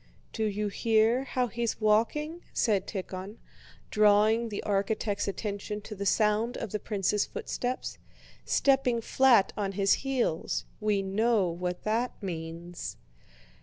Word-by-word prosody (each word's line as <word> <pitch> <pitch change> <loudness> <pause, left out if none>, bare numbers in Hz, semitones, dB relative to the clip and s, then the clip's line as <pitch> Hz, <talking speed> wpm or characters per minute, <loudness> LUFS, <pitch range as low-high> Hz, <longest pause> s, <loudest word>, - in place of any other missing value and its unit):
"Do 220 - -1
you 210 0 -1
hear 225 +4 +2
how 255 -2 0
he's 235 0 -2
walking?" 235 +10 +1
said 205 -5 +1
Tíkhon, 190 +1 -5 0.6
drawing 215 +2 +4
the 205 - -4
architect's 200 +1 0
attention 205 +1 -3
to 215 - -8
the 200 -1 -3
sound 215 +4 +2
of 220 - -5
the 210 - -2
prince's 205 -1 0
footsteps. 250 +1 -4 0.4
"Stepping 270 -4 +2
flat 235 -5 +4
on 200 -2 -2
his 195 0 +3
heels—we 215 -4 -1
know 205 0 +2
what 180 +1 -4
that 230 +4 0
means...." 170 -2 -6
210 Hz, 125 wpm, -29 LUFS, 195-235 Hz, 0.6 s, drawing